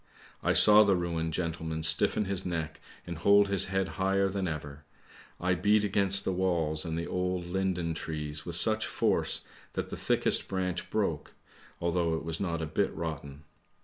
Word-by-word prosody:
I - - +1
saw 105 0 +8
the 100 -2 +3
ruined 85 -2 -2
gentleman 80 -1 -3
stiffen 80 +6 +2
his 95 -1 -1
neck 80 -3 -4 0.2
and 85 -2 -7
hold 100 +3 +4
his 100 -2 +1
head 95 0 -1
higher 95 0 +2
than 95 -1 -2
ever. 75 -2 -6 0.6
I 90 +1 +1
beat 105 +4 +2
against 100 -1 +2
the 95 - 0
walls 85 -4 0
and 80 -2 -4
the 85 - -3
old 90 0 -2
linden 90 -2 -2
trees 75 -2 -5
with 85 - -4
such 110 +5 +3
force - - 0 0.3
that - - -4
the - - -5
thickest - - +1
branch 90 -2 -3
broke, - - -2 0.4
although 85 -1 0
it 80 - -5
was 80 0 -2
not 85 -4 -2
a - - -1
bit 75 - -1
rotten. 75 -3 -6
85 Hz, 175 wpm, -29 LUFS, 80-95 Hz, 0.6 s, saw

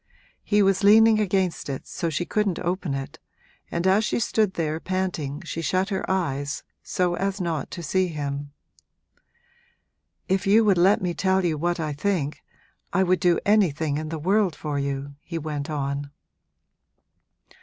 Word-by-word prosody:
He 205 -1 +2
was 195 0 +2
leaning 220 +2 +7
against 190 -6 0
it, 135 -1 -4
so 170 - -3
she 160 +3 -2
couldn't 205 -2 0
open 175 -4 -2
it, 135 0 -6 0.5
and 170 +1 -2
as 195 +3 +4
she - - 0
stood 215 -3 +1
there 160 -1 -1
panting 175 -5 -3
she 165 - -4
shut 185 +4 0
her 190 -2 -2
eyes, 145 -7 -1 0.2
so 180 -1 0
as 195 +2 -2
not 165 -6 -2
to 175 - -7
see 185 +3 +1
him. 145 -3 -4 1.8
'If 190 +1 0
you 215 +3 +5
would 195 -4 +4
let 190 +2 +4
me 175 -1 0
tell 190 +1 +1
you 165 -3 +1
what 175 +3 -1
I 155 -2 -2
think 155 -2 -1 0.5
I 190 - +3
would 185 0 +2
do 175 -2 +3
anything 160 -8 +2
in 155 0 -5
the 165 - -3
world 190 +2 +1
for 145 -2 -3
you!' 140 0 -3
he 170 - -6
went 150 -1 -4
on. 140 -1 -3
175 Hz, 165 wpm, -25 LUFS, 150-190 Hz, 1.8 s, leaning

